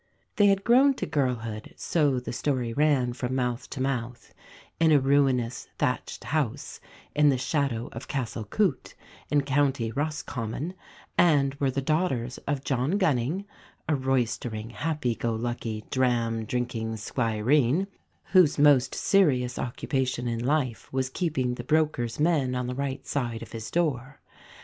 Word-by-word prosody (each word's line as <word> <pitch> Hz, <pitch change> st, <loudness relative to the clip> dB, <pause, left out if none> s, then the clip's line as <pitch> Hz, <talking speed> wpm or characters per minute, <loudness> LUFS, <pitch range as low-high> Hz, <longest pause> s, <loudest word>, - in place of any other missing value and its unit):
They 205 Hz, -2 st, +6 dB
had 195 Hz, 0 st, +3 dB
grown 265 Hz, +3 st, +5 dB
to -, -, -3 dB
girlhood, 115 Hz, -6 st, -2 dB
so 145 Hz, -6 st, +1 dB
the 125 Hz, -, -6 dB
story 125 Hz, -3 st, -1 dB
ran 140 Hz, -3 st, +2 dB
from 130 Hz, 0 st, -3 dB
mouth 125 Hz, 0 st, -2 dB
to 140 Hz, -, -6 dB
mouth, 125 Hz, -3 st, -3 dB, 0.5 s
in 165 Hz, -1 st, +4 dB
a 150 Hz, -, +6 dB
ruinous 135 Hz, -3 st, +1 dB
thatched 125 Hz, -, -2 dB
house, 145 Hz, -3 st, -2 dB, 0.4 s
in 150 Hz, 0 st, +5 dB
the 135 Hz, -, +2 dB
shadow 135 Hz, -4 st, -1 dB
of -, -, -8 dB
Castle 120 Hz, -5 st, -3 dB
Coote, 175 Hz, -, -1 dB, 0.3 s
in 145 Hz, -, +3 dB
County 140 Hz, -4 st, +1 dB
Roscommon, 145 Hz, +1 st, -3 dB, 0.5 s
and 140 Hz, -5 st, +4 dB
were 140 Hz, -, +2 dB
the 135 Hz, +1 st, -2 dB
daughters 135 Hz, -6 st, 0 dB
of 140 Hz, -1 st, -1 dB
John 135 Hz, +8 st, 0 dB
Gunning, 160 Hz, -, +1 dB, 0.4 s
a 155 Hz, -, +2 dB
roystering, 120 Hz, -4 st, -1 dB
happy 145 Hz, -3 st, -1 dB
go 115 Hz, 0 st, -2 dB
lucky, 115 Hz, -2 st, -4 dB
dram 115 Hz, -3 st, +1 dB
drinking 115 Hz, -1 st, -2 dB
squireen, 120 Hz, -, +1 dB, 0.5 s
whose 180 Hz, -6 st, +6 dB
most 140 Hz, -3 st, +5 dB
serious 130 Hz, -11 st, +2 dB
occupation 125 Hz, 0 st, -2 dB
in 115 Hz, 0 st, -2 dB
life 130 Hz, -3 st, -1 dB
was 130 Hz, 0 st, -1 dB
keeping 135 Hz, -7 st, -1 dB
the 120 Hz, -, -6 dB
brokers' 150 Hz, -5 st, 0 dB
men 150 Hz, -5 st, +2 dB
on 125 Hz, 0 st, -1 dB
the 125 Hz, -, -3 dB
right 135 Hz, 0 st, -3 dB
side 120 Hz, -5 st, -2 dB
of -, -, -12 dB
his 115 Hz, -1 st, -6 dB
door. 145 Hz, -5 st, -1 dB
130 Hz, 145 wpm, -27 LUFS, 120-150 Hz, 0.5 s, They